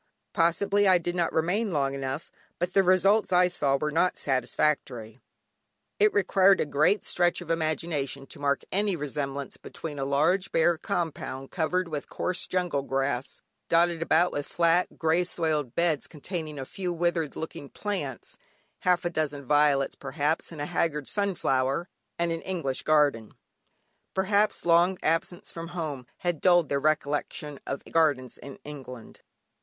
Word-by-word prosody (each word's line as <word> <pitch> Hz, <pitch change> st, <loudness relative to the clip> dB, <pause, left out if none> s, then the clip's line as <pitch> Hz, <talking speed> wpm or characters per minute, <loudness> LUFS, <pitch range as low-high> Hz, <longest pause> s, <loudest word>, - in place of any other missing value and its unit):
Possibly, 195 Hz, +5 st, +2 dB
I 185 Hz, -1 st, +6 dB
did 175 Hz, 0 st, -3 dB
not 170 Hz, -2 st, +1 dB
remain 190 Hz, +7 st, 0 dB
long 140 Hz, -4 st, 0 dB
enough, 135 Hz, +2 st, -4 dB, 0.3 s
but 175 Hz, +1 st, -2 dB
the 195 Hz, -, +5 dB
results 190 Hz, +3 st, +3 dB
I 180 Hz, 0 st, +5 dB
saw 140 Hz, -6 st, +1 dB
were 150 Hz, +2 st, -2 dB
not 175 Hz, +4 st, +2 dB
satisfactory; 130 Hz, -4 st, -1 dB, 0.8 s
it 210 Hz, +1 st, +5 dB
required 195 Hz, -1 st, +4 dB
a -, -, +1 dB
great 150 Hz, +8 st, +2 dB
stretch 175 Hz, 0 st, +1 dB
of 170 Hz, -2 st, -5 dB
imagination 155 Hz, -4 st, -2 dB
to 145 Hz, -, -10 dB
mark 140 Hz, -1 st, 0 dB
any 200 Hz, 0 st, +1 dB
resemblance 140 Hz, -2 st, -4 dB
between 150 Hz, -3 st, -7 dB
a -, -, -1 dB
large 160 Hz, +8 st, +1 dB
bare 165 Hz, 0 st, +3 dB
compound 160 Hz, -8 st, -3 dB
covered 180 Hz, +1 st, 0 dB
with 150 Hz, -3 st, -5 dB
coarse 180 Hz, 0 st, -2 dB
jungle 180 Hz, -6 st, 0 dB
grass, 135 Hz, -1 st, -2 dB, 0.3 s
dotted 170 Hz, 0 st, +3 dB
about 165 Hz, +2 st, +3 dB
with 145 Hz, 0 st, -4 dB
flat 170 Hz, +1 st, +1 dB
grey 160 Hz, +2 st, +2 dB
soiled 155 Hz, -7 st, -1 dB
beds 170 Hz, -3 st, +1 dB
containing 155 Hz, -1 st, -6 dB
a 135 Hz, -, -5 dB
few 180 Hz, +4 st, -4 dB
withered 170 Hz, -3 st, -1 dB
looking 160 Hz, -3 st, -6 dB
plants 165 Hz, -, -5 dB, 0.4 s
(half 180 Hz, -1 st, +2 dB
a -, -, +2 dB
dozen 145 Hz, -4 st, -2 dB
violets 145 Hz, 0 st, +3 dB
perhaps, 145 Hz, +4 st, -2 dB
and 165 Hz, -, -9 dB
a -, -, -1 dB
haggard 150 Hz, -3 st, -1 dB
sunflower), 170 Hz, -7 st, 0 dB, 0.3 s
and 170 Hz, 0 st, 0 dB
an 165 Hz, 0 st, -3 dB
English 165 Hz, -9 st, -2 dB
garden. 145 Hz, -8 st, +2 dB, 0.8 s
Perhaps 200 Hz, +2 st, +1 dB
long 175 Hz, +2 st, +4 dB
absence 165 Hz, +2 st, -1 dB
from 165 Hz, 0 st, -7 dB
home 145 Hz, -7 st, -4 dB
had 175 Hz, -3 st, -2 dB
dulled 175 Hz, -3 st, +4 dB
their 140 Hz, -, +1 dB
recollection 150 Hz, -1 st, -1 dB
of 140 Hz, -, -4 dB
gardens 145 Hz, -6 st, +1 dB
in 140 Hz, -1 st, -10 dB
England. 130 Hz, -5 st, -10 dB
160 Hz, 150 wpm, -27 LUFS, 140-175 Hz, 0.8 s, I